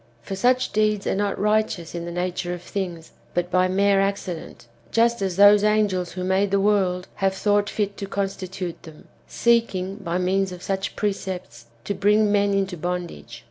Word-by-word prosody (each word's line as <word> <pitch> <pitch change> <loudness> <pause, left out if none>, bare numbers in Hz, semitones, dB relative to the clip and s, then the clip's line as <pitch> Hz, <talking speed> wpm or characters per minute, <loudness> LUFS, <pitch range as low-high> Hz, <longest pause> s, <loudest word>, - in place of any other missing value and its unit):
For 195 - -5
such 250 +5 +2
deeds 215 -1 +1
are - - +1
not 200 0 -1
righteous 210 -5 0
in 170 -1 -4
the 170 - -5
nature 180 0 -2
of 175 - -11
things, 175 -4 -5 0.2
but 175 0 -1
by 185 +1 +3
mere 195 +1 +3
accident, 195 -8 -4 0.3
just 235 -1 +2
as 190 -2 -1
those 205 +1 +7
angels 210 -4 +1
who 185 - -4
made 190 +2 +1
the 200 0 +2
world, 190 -3 +1
have 195 -1 +1
thought 205 +1 +1
fit 205 -2 -2
to 200 - -5
constitute 190 -2 -4
them, 160 -2 -14 0.2
seeking, 200 -5 +1
by 175 -4 -3
means 190 +1 +1
of 180 0 -9
such 195 0 -2
precepts, 185 - -4 0.2
to 200 - -2
bring 210 +1 +3
men 205 0 +3
into 195 -2 -1
bondage. 175 -9 -5
195 Hz, 180 wpm, -23 LUFS, 180-205 Hz, 0.3 s, those